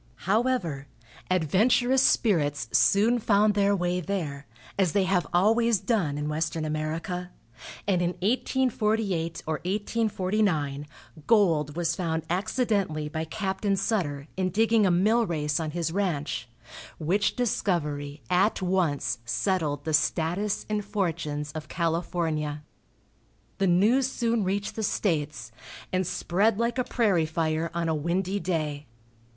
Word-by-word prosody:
However, 195 - 0 0.4
adventurous 220 - +3
spirits 145 - +2
soon 215 - +4
found 210 -1 +3
their 200 0 +3
way 180 -1 -1
there, 155 -7 -4 0.3
as 185 -5 +1
they 200 - +3
have 185 -1 +1
always 225 +4 +3
done 180 - 0
in 150 0 -3
Western 155 +1 -2
America, 160 +4 -3 0.6
and 185 -3 +2
in 175 0 0
1848 215 -7 0
or 155 -1 -1
1849 190 -7 -1 0.4
gold 165 -10 +3
was 170 -1 0
found 160 -3 -2
accidentally 195 -6 0
by 160 +1 -3
Captain 195 +3 -1
Sutter, 170 -9 -1
in 185 -1 0
digging 220 +2 +3
a - - +3
mill 215 +6 +3
race 150 -1 -1
on 160 -1 -2
his 165 +1 -2
ranch, 155 - -2 0.5
which 185 +6 +1
discovery 150 - -1
at 185 +5 +2
once 165 -10 0
settled 145 - -1
the 160 - -1
status 175 +6 0
and 210 -1 -1
fortunes 165 -7 -2
of 155 0 -7
California. 165 -3 -1 1.0
The 195 - +2
news 225 +9 +3
soon 230 -3 0
reached 195 +2 -2
the 220 - -3
States, 150 - -1 0.4
and 185 -1 +1
spread 200 +4 +1
like 235 +2 0
a - - +2
prairie 200 -11 +1
fire 160 0 -1
on 170 -1 -1
a 160 - +1
windy 180 +6 -1
day. 155 -5 -2
180 Hz, 130 wpm, -27 LUFS, 155-205 Hz, 1.0 s, soon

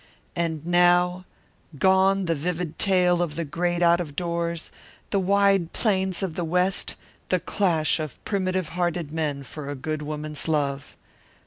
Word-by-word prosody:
And 165 -3 -2
now, 175 +1 +3 0.5
gone 190 +3 +3
the 165 - +1
vivid 165 +1 -3
tale 180 -3 +3
of 170 -4 -2
the 170 - -2
great 175 +3 -1
out 170 0 +5
of 150 -4 -7
doors, 170 -1 -2 0.4
the 200 - +2
wide 195 -2 +2
plains 190 -3 +1
of 185 -4 -2
the 175 +1 -3
West, 180 +3 +1 0.3
the - - +2
clash 170 -6 +1
of 155 -4 -5
primitive 185 -4 -1
hearted 175 -2 -2
men 150 -4 -2
for 140 +1 -8
a 145 - -3
good 155 +3 -4
woman's 150 0 -4
love. 140 -3 -1
175 Hz, 150 wpm, -25 LUFS, 155-185 Hz, 0.5 s, out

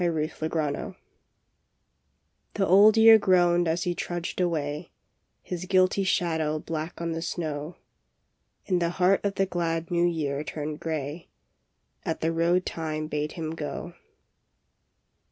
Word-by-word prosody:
BLOOD 160 -1 -2
ROAD 155 +3 -2 1.6
THE 195 - +1
Old 205 +4 +6
Year 225 0 +8
groaned 175 -3 +3
as 160 +1 0
he 175 - 0
trudged 175 +1 -4
away, 155 -2 -2 0.5
His 180 0 -5
guilty 185 +1 +3
shadow 160 -4 0
black 160 +2 -5
on 170 0 -2
the 165 0 -3
snow, 155 -1 -4 0.9
And 180 -2 0
the 170 - +1
heart 190 +1 +3
of 200 -1 -1
the 195 - +2
glad 165 -2 -2
New 175 0 +3
Year 150 -4 -2
turned 150 0 -5
grey 155 0 -4 0.7
At 160 - -3
the 165 +1 0
road 170 +2 +2
Time 155 -1 -3
bade 150 0 -3
him 160 -2 -4
go. 155 -2 -6
165 Hz, 135 wpm, -26 LUFS, 155-180 Hz, 1.6 s, Year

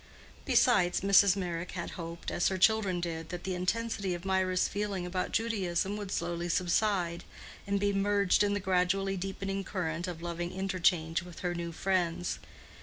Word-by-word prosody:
Besides, 185 -8 +3
Mrs. 200 0 +6
Meyrick 175 -2 -4
had 170 -2 -4
hoped, 170 -1 -6
as 175 - +1
her 190 - 0
children 195 -2 +3
did, 165 -2 -4
that 175 -1 -6
the 190 - -2
intensity 195 0 -1
of 175 +2 -9
Mirah's 185 -1 +2
feeling 200 -3 -2
about 180 +1 -2
Judaism 200 -4 0
would 205 -2 -5
slowly 170 0 -2
subside, 175 0 +1 0.4
and 200 0 +1
be 200 0 +1
merged 200 -1 +3
in 205 0 +2
the - - 0
gradually 190 +1 +1
deepening 195 +1 -3
current 175 -3 -3
of 170 -2 -6
loving 175 0 -3
interchange 180 -3 +1
with 175 -1 -11
her 175 -1 -1
new 170 -1 -4
friends. 175 0 -1
185 Hz, 165 wpm, -31 LUFS, 175-195 Hz, 0.4 s, Mrs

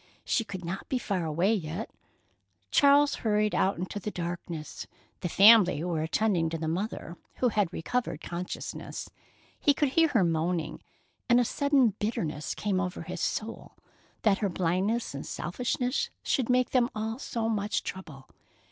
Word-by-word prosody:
She 230 - +1
could 185 -4 -7
not 190 +3 -5
be 260 - +1
far 195 -8 -2
away 170 +7 +2
yet. 180 +1 -3 0.8
Charles 285 +1 +5
hurried 210 -1 +1
out 195 +1 +2
into 185 +4 -4
the 205 - -4
darkness. 170 -4 -5 0.3
The 175 - -3
family 200 -5 +7
were 170 -3 -1
attending 170 0 +1
to 165 - -3
the 160 0 -3
mother, 175 0 -3 0.2
who 250 - +2
had 205 -5 +1
recovered 235 -1 -2
consciousness. 175 +2 -6 0.5
He 290 -2 +3
could 290 -1 +2
hear 325 +5 +4
her 235 -10 +2
moaning, 165 0 -1 0.5
and 240 +1 +6
a 245 - +3
sudden 280 -1 +3
bitterness 155 -9 -2
came 200 -3 0
over 180 -2 -3
his 180 +1 -6
soul, 225 +1 -3 0.5
that 210 -3 +3
her 205 - 0
blindness 185 +6 0
and 140 - -5
selfishness 245 +7 -2
should 260 -4 0
make 250 0 +3
them 250 -2 +3
all 220 +3 -3
so 230 -5 -2
much 210 -2 -1
trouble. 155 -8 -8
200 Hz, 155 wpm, -29 LUFS, 170-230 Hz, 0.8 s, family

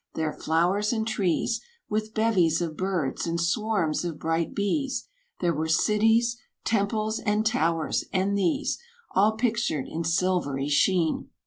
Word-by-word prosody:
there 160 -1 -1
flowers 180 +6 +1
and 220 -2 -1
trees, 210 +1 0 0.3
With 215 0 -2
bevies 185 -8 +3
of 165 -3 -3
birds, 180 -5 -1
and 170 0 -1
swarms 175 -2 0
of 170 -3 -4
bright 165 +1 -1
bees; 260 +6 -1 0.3
There 175 -2 +2
were 160 +1 -2
cities 225 +7 +3 0.3
temples, 215 0 0
and 210 +1 0
towers; 165 -7 +1
and 195 +2 +1
these, 185 -5 0 0.3
All 210 +3 +4
pictured 220 - 0
in 165 +1 -4
silvery 165 -5 0
sheen! 165 +2 +2
185 Hz, 135 wpm, -26 LUFS, 165-215 Hz, 0.3 s, All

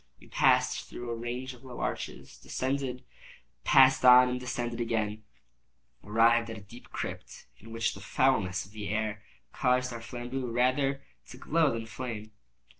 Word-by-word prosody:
We - - -17
passed - - +2
through 120 -1 -6
a - - -2
range 120 +3 -5
of 125 +1 -17
low 125 -2 -9
arches, - - -5
descended, 130 -1 -3 0.6
passed 130 -1 +6
on, 125 0 +8
and 125 0 -2
descending 120 -2 -3
again, 110 -2 -1 0.8
arrived 115 +2 +3
at 110 - -6
a - - -10
deep 115 +5 -14
crypt, - - -6
in 115 +2 -13
which 115 0 -1
the - - -11
foulness 110 -9 +1
of 95 - -17
the 105 -3 -6
air 105 0 -2 0.3
caused 125 -1 +1
our 115 - -7
flambeaux 125 +2 -5
rather 130 +3 +1 0.2
to 125 - -11
glow 155 +2 +2
than 115 -1 -4
flame. 110 -2 -6
120 Hz, 160 wpm, -29 LUFS, 115-130 Hz, 0.8 s, on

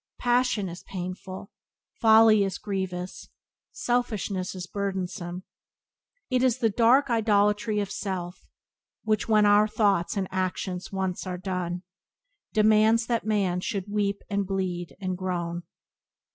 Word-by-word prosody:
Passion 245 -4 +1
is 175 +1 -8
painful; 185 +2 -7 0.5
folly 220 -2 +6
is 195 -1 -2
grievous; 190 -3 -4 0.4
selfishness 215 -6 -1
is 180 -1 -5
burdensome. 185 -2 -4 0.9
"It 255 -1 +2
is 255 -2 +3
the 230 -3 +1
dark 240 +5 +4
idolatry 210 -1 +2
of 200 -1 -2
self 180 -3 -5 0.6
Which, 215 0 0
when 215 -1 +5
our 205 +1 +5
thoughts 200 -4 +1
and 190 -1 -1
actions 185 0 -3
once 190 -1 -3
are 180 -1 -3
done, 180 -1 -3 0.7
Demands 220 +1 +4
that 230 -2 -1
man 195 -4 +1
should 195 +2 -3
weep, 200 -1 0
and 200 -2 -1
bleed, 180 -5 -3
and 185 -2 -2
groan." 175 -2 -3
200 Hz, 125 wpm, -26 LUFS, 185-215 Hz, 0.9 s, folly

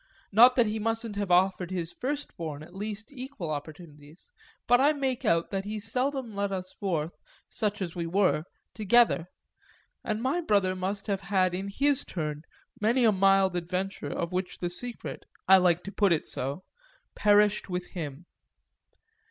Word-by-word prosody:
Not 240 +5 +7
that 240 - +4
he 215 0 -2
mustn't 225 0 -1
have 200 -2 -2
offered 180 0 +3
his 175 -3 -3
firstborn 170 - -4
at 175 +3 -14
least 210 +3 -5
equal 255 - -6
opportunities; 150 - -9 0.3
but 245 +1 +5
I 290 +3 +5
make 265 -4 -2
out 165 0 +2
that 195 -1 -2
he 210 +1 -4
seldom 255 +2 -2
led 200 0 -1
us 185 -1 -4
forth, 170 -5 -2 0.3
such 210 -2 -2
as 170 -3 -6
we 170 -1 -3
were, 180 -3 +2 0.3
together, 215 -5 +3 0.8
and 215 -1 -2
my 265 +9 0
brother 200 - +2
must 195 +2 -3
have 200 -2 -1
had 185 -1 +1
in 190 +2 -3
his 280 +7 +1
turn 150 -4 -4 0.4
many 235 +4 +3
a 220 - +6
mild 195 -1 +3
adventure 185 +3 -3
of 170 +1 -3
which 185 0 -3
the 175 -1 -3
secret 240 +6 -6 0.2
I 190 +1 +9
like 180 -2 +3
to 200 - -6
put 200 -2 +2
it 160 - +1
so 140 +8 -4 0.5
perished 210 -1 +3
with 180 0 -3
him. 155 -2 -6
195 Hz, 165 wpm, -28 LUFS, 175-220 Hz, 0.8 s, I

